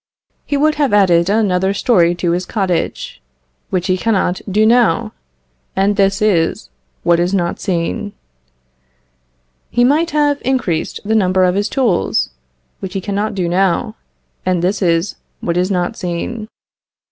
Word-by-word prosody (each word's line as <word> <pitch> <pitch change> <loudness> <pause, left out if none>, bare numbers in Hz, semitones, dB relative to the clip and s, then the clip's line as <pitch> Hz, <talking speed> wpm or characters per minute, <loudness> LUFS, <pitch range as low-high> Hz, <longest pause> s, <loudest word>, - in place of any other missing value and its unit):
He 285 - 0
would 305 +2 +3
have 275 -7 +1
added 180 -3 +4
another 195 -2 +1
story 175 -7 +3
to 175 -1 -1
his 180 +1 -2
cottage, 185 - -2 0.5
which 185 -2 -1
he 185 -1 0
cannot 190 -4 0
do 210 +3 +3
now, 230 -6 +3 0.6
and 195 +2 +2
this 195 +1 +2
is 165 - +1 0.3
what 170 0 +3
is 180 +3 +1
not 175 -2 -1
seen. 190 +3 -2 1.6
He 240 - +2
might 305 +6 +3
have 290 -2 +1
increased 240 -12 -1
the 220 - 0
number 185 -3 +3
of 180 0 +3
his 205 +2 -1
tools, 235 - 0 0.5
which 190 0 -7
he - - 0
cannot 205 +2 -2
do 180 -3 -1
now, 190 +4 0 0.5
and 180 -2 0
this 190 +2 0
is 170 +1 +1 0.2
what 170 - -2
is 180 +2 +1
not 180 -3 -1
seen. 200 +6 -4
190 Hz, 145 wpm, -17 LUFS, 175-215 Hz, 1.6 s, added